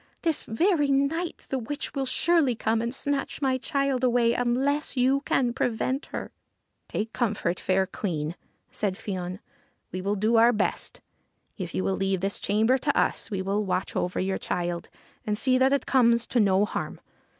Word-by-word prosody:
This 325 -3 +1
very 315 - +2
night 280 +5 0
the 265 - -1
witch 265 +5 -5
will 270 -2 -1
surely 310 -4 +2
come 225 0 0
and 235 - -1
snatch 285 0 -2
my 260 -3 +1
child 275 -2 0
away 240 -2 +3
unless 265 +5 0
you 265 +2 +3
can 245 -3 +1
prevent 255 +4 -1
her.' - - -6 0.3
' - - -50
Take 220 +1 -3
comfort, 200 -7 -1
fair 190 0 +2
Queen,' 165 -5 -3 0.4
said 200 -3 -1
Fion. 185 -2 -4 0.3
' - - -43
We 185 - -4
will 200 +2 0
do 215 +3 +2
our 235 +2 +6
best. 215 - -1 0.5
If 180 -4 -6
you 185 - 0
will 195 - 0
leave 195 -1 0
this 195 +1 -2
chamber 220 +6 +2
to 285 +2 0
us - - 0
we 195 -3 -2
will 200 +2 0
watch 185 -1 -2
over 180 - -1
your 190 0 -1
child 175 -1 -3 0.3
and 210 -1 -1
see 255 +2 +3
that 265 +1 +4
it 280 - +1
comes 235 -3 +4
to 240 - 0
no 200 -1 +4
harm. - - -4
235 Hz, 185 wpm, -26 LUFS, 195-270 Hz, 0.5 s, our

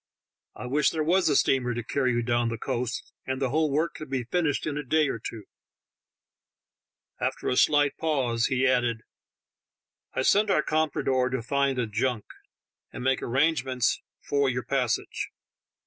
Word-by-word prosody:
I - - -7
wish 140 +4 +2
there 160 -1 -1
was 175 +2 +3
a 145 - +2
steamer 125 -3 +2
to 120 - -3
carry 130 +2 0
you 120 0 0
down 120 0 +1
the 115 - -3
coast, 125 0 -3
and 130 0 -2
the 135 -3 0
whole 155 +1 +2
work 155 +3 0
could 155 - -9
be 135 -2 -1
finished 150 +3 0
in 150 - -2
a 150 - -2
day 155 +3 +2
or 115 - -3
two." 110 0 -7 1.8
After - - -2
a - - +1
slight 145 +1 +3
pause 130 -7 0
he 130 0 +1
added: 120 -3 +1 1.1
"I - - +1
sent 205 +8 +4
our 150 - +3
com 155 0 +1
prador 130 -2 0
to 130 -2 -3
find 140 +1 0
a 125 - +1
junk, 110 +1 -1 0.7
and - - -7
make 130 0 +1
arrangements 130 -3 +1 0.2
for 140 -1 +1
your 125 -1 -2
passage. 125 -1 -1
130 Hz, 170 wpm, -27 LUFS, 120-150 Hz, 1.8 s, sent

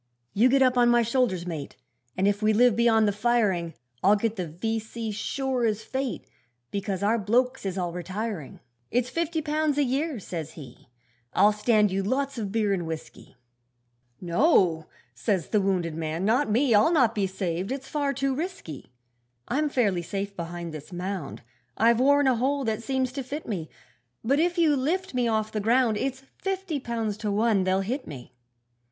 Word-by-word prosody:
'You 230 +6 +4
get 270 +1 +4
up 255 -1 +3
on 240 0 +5
my 240 0 +4
shoulders, 230 -7 0
mate, 160 -5 -6 0.4
And 190 - +2
if 205 +1 +1
we 215 0 +3
live 240 0 +5
beyond 225 -2 +4
the - - +3
firing, 205 -6 +1 0.3
I'll 200 +3 +6
get 220 +1 -1
the 180 -4 -3
V.C. 220 +6 -4
sure 255 +4 -2
as 220 -1 0
fate, 265 0 -3 0.5
Because 200 -1 -3
our 225 +3 +2
blokes 245 +3 +1
is 190 0 -3
all 175 -2 -2
retiring. 185 -2 -5 0.3
'It's 245 +1 0
fifty 330 +1 -1
pounds 300 -1 0
a 290 - +4
year,' 275 +1 -1
says 160 -5 -6
he, 130 -7 -12 0.5
'I'll 205 +3 +6
stand 210 -1 +3
you 195 +1 0
lots 265 +5 -1
of 205 -3 -3
beer 215 -2 +1
and 175 -4 -2
whisky.' 160 -4 -8 0.8
'No,' 175 - +2 0.3
says 170 - -1
the 210 - +2
wounded 185 -4 0
man, 160 +3 -3
'not 245 +6 +2
me, 240 +3 +3
I'll 215 +10 +5
not 255 -9 +3
be 200 -3 0
saved, 185 +1 -3
it's 265 0 -4
far 290 -2 -1
too 275 0 -1
risky. 275 - -6 0.6
'I'm 295 +4 +1
fairly 205 -10 +1
safe 195 +4 -4
behind 170 -1 -6
this 155 +3 -9
mound, 180 -6 -5 0.3
I've 230 +1 +4
worn 285 +2 +4
a 260 -3 +3
hole 275 +3 0
that 220 -2 -1
seems 260 0 -1
to 270 +1 -4
fit 290 +5 -6
me; 175 -8 -4 0.5
But 275 +6 +2
if 350 +2 +1
you 320 -4 +4
lift 345 +8 -1
me 250 -1 +1
off 220 -1 0
the 215 - -2
ground, 230 +1 +3
It's 265 +4 -3 0.2
fifty 385 -5 -2
pounds 225 -4 -3
to 215 -1 -2
one 210 -2 +2
they'll 190 +1 +2
hit 250 +8 -3
me.' 125 -3 -9
220 Hz, 185 wpm, -26 LUFS, 190-260 Hz, 0.8 s, I'll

